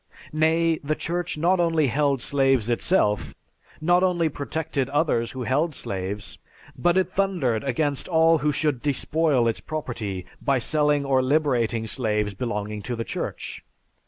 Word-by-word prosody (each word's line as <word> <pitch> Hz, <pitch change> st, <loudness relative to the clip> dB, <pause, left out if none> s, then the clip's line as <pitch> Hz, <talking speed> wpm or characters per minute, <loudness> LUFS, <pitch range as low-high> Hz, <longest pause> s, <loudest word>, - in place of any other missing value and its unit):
Nay, 160 Hz, +1 st, +2 dB
the 155 Hz, +2 st, 0 dB
Church 175 Hz, 0 st, -3 dB
not 175 Hz, +4 st, +2 dB
only 165 Hz, -3 st, +2 dB
held 140 Hz, 0 st, +1 dB
slaves 135 Hz, -5 st, +2 dB
itself, 115 Hz, -, +1 dB, 0.4 s
not 175 Hz, +3 st, +3 dB
only 175 Hz, -3 st, +2 dB
protected 140 Hz, 0 st, -3 dB
others 145 Hz, -5 st, +1 dB
who 130 Hz, -1 st, -5 dB
held 145 Hz, +5 st, 0 dB
slaves, 100 Hz, +1 st, -4 dB, 0.4 s
but 175 Hz, +1 st, +2 dB
it 190 Hz, -, +1 dB
thundered 175 Hz, -, 0 dB
against 140 Hz, +1 st, -1 dB
all 165 Hz, -1 st, +4 dB
who 150 Hz, +1 st, +1 dB
should 145 Hz, -3 st, -1 dB
despoil 145 Hz, -2 st, +1 dB
its 115 Hz, -, -1 dB
property 115 Hz, -, -5 dB, 0.2 s
by 140 Hz, -1 st, +2 dB
selling 145 Hz, +2 st, +1 dB
or 135 Hz, -1 st, +3 dB
liberating 130 Hz, -5 st, +1 dB
slaves 105 Hz, -3 st, -1 dB
belonging 105 Hz, -1 st, -4 dB
to 120 Hz, +4 st, -4 dB
the 115 Hz, -, -3 dB
Church. -, -, -5 dB
140 Hz, 145 wpm, -24 LUFS, 120-160 Hz, 0.4 s, all